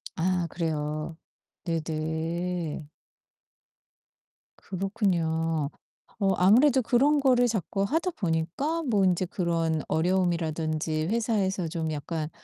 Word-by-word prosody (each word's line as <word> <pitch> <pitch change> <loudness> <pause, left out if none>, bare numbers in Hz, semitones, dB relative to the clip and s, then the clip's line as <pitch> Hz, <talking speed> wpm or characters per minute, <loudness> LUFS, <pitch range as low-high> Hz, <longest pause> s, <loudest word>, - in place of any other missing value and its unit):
아 180 0 0
그래요. 155 -1 -3 0.5
네네. 160 0 -2 1.7
그렇군요. 165 -6 -1 0.5
어 195 -1 +3
아무래도 250 +8 +5
그런 280 +6 +3
거를 250 -3 +4
자꾸 200 -2 -1
하다 325 - 0
보니까 210 - -1
뭐 210 -8 +2
인제 185 0 +2
그런 165 -3 0
어려움이라든지 160 -3 0
회사에서 205 -5 0
좀 160 -1 -3
약간 155 +1 -3
175 Hz, 215 characters per minute, -27 LUFS, 160-205 Hz, 1.7 s, 아무래도